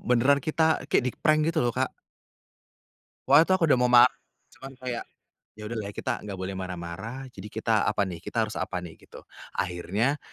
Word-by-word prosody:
beneran 130 Hz, +4 st, +3 dB
kita 160 Hz, +2 st, +1 dB
kek -, -, +2 dB
di-prank 155 Hz, +4 st, +2 dB
gitu 165 Hz, 0 st, +1 dB
loh, 120 Hz, 0 st, 0 dB
Kak. 130 Hz, +1 st, 0 dB, 1.4 s
Waktu 145 Hz, +4 st, +8 dB
itu -, -, +3 dB
aku 175 Hz, -, 0 dB
udah -, -, +4 dB
mau 125 Hz, -, +3 dB
ma 120 Hz, -1 st, +8 dB, 0.5 s
cuman 135 Hz, 0 st, -10 dB
kayak 125 Hz, -2 st, -4 dB, 0.5 s
ya 105 Hz, -, -8 dB
udahlah 110 Hz, -2 st, -4 dB
kita 120 Hz, 0 st, -3 dB
nggak 100 Hz, -2 st, -6 dB
boleh 95 Hz, +1 st, -4 dB
marah-marah, 95 Hz, +8 st, -6 dB
jadi 105 Hz, -, -9 dB
kita 110 Hz, +1 st, 0 dB, 0.2 s
apa 105 Hz, -, 0 dB
nih, 85 Hz, -3 st, -6 dB
kita 115 Hz, -2 st, -1 dB
harus 110 Hz, -, -8 dB
apa 90 Hz, -, -3 dB
nih, 80 Hz, -2 st, -9 dB
gitu. -, -, -14 dB, 0.3 s
Akhirnya, 100 Hz, -, -1 dB
120 Hz, 180 wpm, -27 LUFS, 100-135 Hz, 1.4 s, Waktu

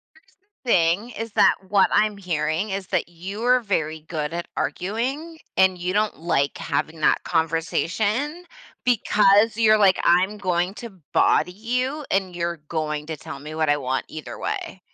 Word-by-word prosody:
Here's -, -, -26 dB
the 400 Hz, -10 st, -13 dB
thing, 175 Hz, +7 st, +3 dB
is 225 Hz, 0 st, -6 dB
that -, -, +5 dB
what 195 Hz, 0 st, +4 dB
I'm 210 Hz, 0 st, +3 dB
hearing 165 Hz, +1 st, -1 dB
is 190 Hz, -1 st, -4 dB
that -, -, -1 dB
you 190 Hz, +6 st, -7 dB
are 250 Hz, +1 st, +5 dB
very 160 Hz, -8 st, -2 dB
good 155 Hz, 0 st, -4 dB
at 170 Hz, 0 st, -4 dB
arguing, 265 Hz, -, -3 dB, 0.2 s
and 190 Hz, -1 st, +4 dB
you 180 Hz, +1 st, -2 dB
don't 210 Hz, +1 st, 0 dB
like 140 Hz, -4 st, 0 dB
having 160 Hz, 0 st, -3 dB
that -, -, +3 dB
conversation, 200 Hz, -, -1 dB, 0.4 s
because 210 Hz, -2 st, +4 dB
you're 215 Hz, -1 st, +5 dB
like, 195 Hz, -3 st, +4 dB
"I'm 185 Hz, +4 st, +3 dB
going 180 Hz, 0 st, -1 dB
to 215 Hz, -7 st, -10 dB
body 180 Hz, -, +3 dB
you, 250 Hz, +8 st, -2 dB
and 190 Hz, -2 st, 0 dB
you're 170 Hz, 0 st, -2 dB
going 150 Hz, -2 st, -3 dB
to 160 Hz, -1 st, -5 dB
tell -, -, -8 dB
me 150 Hz, +2 st, -8 dB
what 155 Hz, -1 st, 0 dB
I 145 Hz, -, +4 dB
want, 130 Hz, -2 st, -2 dB
either 155 Hz, -2 st, -8 dB
way." -, -, -4 dB
190 Hz, 170 wpm, -23 LUFS, 165-215 Hz, 0.4 s, that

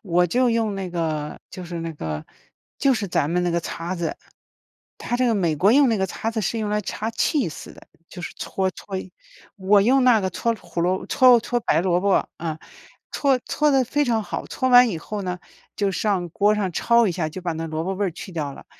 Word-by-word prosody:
我 180 Hz, -3 st, +2 dB
就 250 Hz, +8 st, +2 dB
用 225 Hz, -3 st, 0 dB
那 195 Hz, -1 st, -4 dB
个 155 Hz, -3 st, -3 dB
就 185 Hz, -, -8 dB
是 170 Hz, -1 st, -6 dB
那 165 Hz, 0 st, -4 dB
个 80 Hz, -, -5 dB, 0.5 s
就 275 Hz, -2 st, +3 dB
是 205 Hz, -4 st, -3 dB
咱 145 Hz, -2 st, 0 dB
们 180 Hz, +1 st, +1 dB
那 175 Hz, -, 0 dB
个 170 Hz, 0 st, 0 dB
擦 170 Hz, +2 st, -5 dB
子。 170 Hz, -2 st, -3 dB, 0.9 s
它 240 Hz, -, -1 dB
这 250 Hz, 0 st, +2 dB
个 230 Hz, -, +2 dB
美 170 Hz, -6 st, +1 dB
国 195 Hz, +9 st, +4 dB
用 280 Hz, 0 st, +5 dB
那 225 Hz, -3 st, +1 dB
个 190 Hz, -, +1 dB
擦 220 Hz, +4 st, -3 dB
子 225 Hz, -1 st, -2 dB
是 225 Hz, +3 st, -1 dB
用 210 Hz, -, -2 dB
来 210 Hz, 0 st, +1 dB
擦 215 Hz, +2 st, -4 dB
cheese 230 Hz, -, -1 dB
的， -, -, -16 dB, 0.3 s
就 175 Hz, -, -9 dB
是 -, -, -6 dB
搓 190 Hz, -1 st, -2 dB
搓。 190 Hz, -1 st, -7 dB, 0.4 s
我 200 Hz, +1 st, +4 dB
用 260 Hz, +4 st, +4 dB
那 240 Hz, -4 st, +5 dB
个 190 Hz, -1 st, -1 dB
搓 230 Hz, +5 st, -1 dB
胡 175 Hz, -1 st, -5 dB
萝 180 Hz, +2 st, 0 dB
搓 250 Hz, -3 st, +6 dB
搓 240 Hz, +2 st, -1 dB
白 160 Hz, -, +2 dB
萝 180 Hz, 0 st, +1 dB
卜， 200 Hz, 0 st, +2 dB
嗯， 160 Hz, -2 st, -3 dB, 0.5 s
戳 275 Hz, -2 st, +2 dB
搓 300 Hz, -, +1 dB
得 265 Hz, -2 st, +3 dB
非 290 Hz, +5 st, 0 dB
常 230 Hz, -4 st, +1 dB
好， -, -, -5 dB
搓 260 Hz, -, -1 dB
完 245 Hz, 0 st, +7 dB
以 185 Hz, -, -3 dB
后 205 Hz, +4 st, -5 dB
呢 180 Hz, -1 st, -3 dB, 0.4 s
就 200 Hz, -2 st, 0 dB
上 190 Hz, -1 st, -1 dB
锅 205 Hz, +5 st, +2 dB
上 205 Hz, -3 st, -1 dB
焯 235 Hz, +7 st, +3 dB
一 -, -, -1 dB
下， 160 Hz, -3 st, -2 dB
就 180 Hz, +4 st, -8 dB
把 175 Hz, -1 st, -1 dB
那 165 Hz, +1 st, -4 dB
萝 160 Hz, 0 st, -3 dB
卜 195 Hz, -, -2 dB
味 200 Hz, +1 st, -1 dB
儿 180 Hz, -, -3 dB
去 185 Hz, -, -9 dB
掉 150 Hz, -4 st, -3 dB
了。 -, -, -12 dB
190 Hz, 265 characters per minute, -23 LUFS, 170-230 Hz, 0.9 s, 完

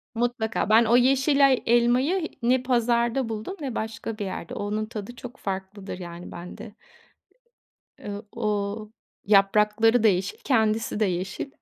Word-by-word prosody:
Mutlaka. 225 Hz, -3 st, -1 dB
Ben 225 Hz, +2 st, +6 dB
o 235 Hz, +2 st, +4 dB
yeşil 270 Hz, +2 st, +4 dB
ay 260 Hz, -2 st, +1 dB
elmayı 250 Hz, +9 st, +2 dB, 0.2 s
ne 250 Hz, +1 st, +3 dB
pazarda 240 Hz, 0 st, +1 dB
buldum, 220 Hz, -, -5 dB
ne 260 Hz, -5 st, -4 dB
başka 220 Hz, 0 st, -4 dB
bir 205 Hz, -, -3 dB
yerde. 185 Hz, -3 st, -6 dB
Onun 210 Hz, +1 st, -2 dB
tadı 220 Hz, +2 st, -7 dB
çok 250 Hz, +1 st, -10 dB
farklıdır, 190 Hz, 0 st, -6 dB
yani, 175 Hz, 0 st, -8 dB
bende. 180 Hz, +5 st, -9 dB, 1.2 s
Iıı, 205 Hz, +1 st, -7 dB
o, 225 Hz, -2 st, -2 dB, 0.8 s
yaprakları 210 Hz, +3 st, +4 dB
da -, -, +6 dB
yeşil, 190 Hz, 0 st, 0 dB
kendisi 220 Hz, -4 st, +1 dB
de 215 Hz, -, +3 dB
yeşil. 190 Hz, +8 st, -3 dB
225 Hz, 140 wpm, -25 LUFS, 205-245 Hz, 1.2 s, Ben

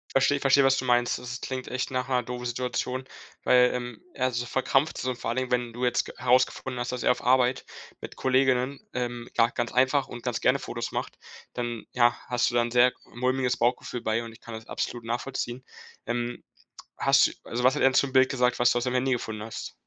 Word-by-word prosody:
Verstehe. 140 Hz, +1 st, +3 dB
Verstehe, 140 Hz, 0 st, +4 dB
was 135 Hz, 0 st, +4 dB
du 130 Hz, -, -2 dB
meinst. 120 Hz, -1 st, +2 dB
Das 125 Hz, 0 st, -6 dB
klingt 130 Hz, -1 st, -5 dB
echt 130 Hz, +1 st, -3 dB
nach 130 Hz, 0 st, -1 dB
'ner 125 Hz, -2 st, +1 dB
doofen 125 Hz, +1 st, -6 dB
Situation, 125 Hz, +1 st, -2 dB, 0.4 s
weil, 125 Hz, 0 st, +5 dB
ähm, 120 Hz, -2 st, -5 dB
er 130 Hz, 0 st, 0 dB
so 120 Hz, 0 st, -3 dB
verkrampft 135 Hz, +3 st, +1 dB
so 130 Hz, -, -2 dB
und 125 Hz, -, -6 dB
vor 115 Hz, -, -3 dB
allen 120 Hz, -, -2 dB
Dingen, 130 Hz, -1 st, -2 dB
wenn 120 Hz, -1 st, 0 dB
du 125 Hz, +2 st, -3 dB
jetzt 125 Hz, 0 st, +1 dB
g -, -, -8 dB
herausgefunden 130 Hz, +1 st, +1 dB
hast, 120 Hz, +1 st, -2 dB
dass 125 Hz, -2 st, -4 dB
er -, -, +4 dB
auf -, -, -3 dB
Arbeit 125 Hz, 0 st, +3 dB, 0.4 s
mit -, -, -8 dB
Kolleginnen, 130 Hz, 0 st, +1 dB
ähm, 120 Hz, -1 st, -4 dB
ja, 115 Hz, 0 st, +5 dB
ganz 120 Hz, -1 st, -2 dB
einfach 130 Hz, +2 st, +2 dB
und 120 Hz, -, -9 dB
ganz 125 Hz, -2 st, -2 dB
gerne -, -, +4 dB
Fotos -, -, -5 dB
macht, -, -, -4 dB, 0.4 s
dann, 120 Hz, -2 st, -4 dB
ja, 120 Hz, -1 st, +3 dB
hast 125 Hz, -1 st, +1 dB
du 120 Hz, -, -5 dB
dann 120 Hz, 0 st, +2 dB
'n -, -, -14 dB
sehr 125 Hz, +1 st, +5 dB, 0.2 s
mulmiges 125 Hz, 0 st, 0 dB
Bauchgefühl 120 Hz, 0 st, -1 dB
bei. 110 Hz, +2 st, 0 dB
Und 115 Hz, -, -8 dB
ich -, -, -17 dB
kann 115 Hz, -1 st, -8 dB
das 110 Hz, +1 st, -9 dB
absolut 120 Hz, -1 st, -4 dB
nachvollziehen, 120 Hz, +1 st, -3 dB, 0.4 s
ähm. 120 Hz, 0 st, -3 dB, 0.5 s
Hast -, -, +4 dB
also, 120 Hz, +1 st, -4 dB
was 130 Hz, +1 st, +5 dB
hat 150 Hz, -, -2 dB
er 135 Hz, -, +6 dB
denn 130 Hz, -, -4 dB
zum 140 Hz, -1 st, +2 dB
Bild 130 Hz, 0 st, +5 dB
gesagt, 125 Hz, -2 st, +1 dB
was 120 Hz, 0 st, +5 dB
du -, -, +1 dB
aus 120 Hz, -, 0 dB
dem 125 Hz, -1 st, -1 dB
Handy 130 Hz, +1 st, +1 dB
gefunden 110 Hz, -3 st, -4 dB
hast? 110 Hz, -, -7 dB
125 Hz, 230 wpm, -27 LUFS, 120-130 Hz, 0.5 s, er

